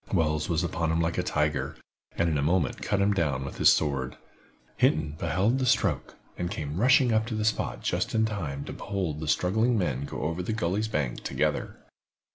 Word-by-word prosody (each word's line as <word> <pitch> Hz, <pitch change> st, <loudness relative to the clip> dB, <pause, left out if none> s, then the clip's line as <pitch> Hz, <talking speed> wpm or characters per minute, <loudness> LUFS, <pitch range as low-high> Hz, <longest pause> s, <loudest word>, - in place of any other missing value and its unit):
Wells 75 Hz, -4 st, +1 dB
was 85 Hz, +1 st, +1 dB
upon 85 Hz, -2 st, -1 dB
him 80 Hz, -, +1 dB
like 85 Hz, 0 st, 0 dB
a -, -, +3 dB
tiger, 75 Hz, -1 st, -1 dB, 0.4 s
and 85 Hz, -, +2 dB
in 75 Hz, -3 st, +1 dB
a -, -, +1 dB
moment 80 Hz, +1 st, +1 dB
cut 100 Hz, -, 0 dB
him 100 Hz, +1 st, +3 dB
down 75 Hz, -8 st, 0 dB
with 70 Hz, -, -7 dB
his -, -, +7 dB
sword. 70 Hz, -4 st, 0 dB, 0.6 s
Hinton 75 Hz, -1 st, +2 dB
beheld 95 Hz, -, +1 dB
the 130 Hz, -, +1 dB
stroke, -, -, +1 dB, 0.2 s
and 90 Hz, -1 st, -1 dB
came 75 Hz, -2 st, -4 dB
rushing 125 Hz, 0 st, +5 dB
up 110 Hz, 0 st, +2 dB
to 115 Hz, -, -3 dB
the 105 Hz, 0 st, -1 dB
spot 110 Hz, -, -1 dB
just -, -, -1 dB
in 110 Hz, 0 st, +3 dB
time 80 Hz, -11 st, -4 dB
to -, -, -6 dB
behold 95 Hz, -7 st, -3 dB
the 80 Hz, -, -5 dB
struggling 110 Hz, +10 st, +2 dB
men 70 Hz, -8 st, -1 dB
go -, -, -5 dB
over 80 Hz, +4 st, -1 dB
the 100 Hz, +5 st, -2 dB
gully's 105 Hz, +1 st, 0 dB
bank 75 Hz, -, -2 dB
together. -, -, -1 dB
85 Hz, 205 wpm, -27 LUFS, 75-105 Hz, 0.6 s, his